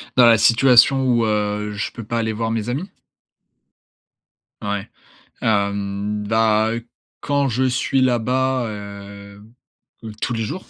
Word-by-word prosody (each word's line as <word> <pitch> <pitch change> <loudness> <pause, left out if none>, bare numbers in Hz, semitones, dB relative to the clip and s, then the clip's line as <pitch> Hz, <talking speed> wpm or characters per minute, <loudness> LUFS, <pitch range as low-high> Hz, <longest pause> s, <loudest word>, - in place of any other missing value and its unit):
Dans 125 - +6
la 115 -1 +6
situation 125 +4 +5
où, 120 -3 +2
heu, 105 -1 -1
je 105 0 -4
peux 115 - -9
pas 115 +2 -3
aller 110 -1 -1
voir 115 +1 -2
mes 115 0 -2
amis? 150 +11 -4 1.7
Ouais. 100 -1 -4 0.5
Hem, 100 0 -1
bah, 110 0 +2 0.5
quand 140 -1 0
je 130 +2 0
suis 130 +1 0
là-bas, 130 +1 +1
heu 100 -1 -10 0.6
heu, 110 - -7
tous - - -2
les 115 - -2
jours. 185 - -6
110 Hz, 135 wpm, -20 LUFS, 105-125 Hz, 1.7 s, Dans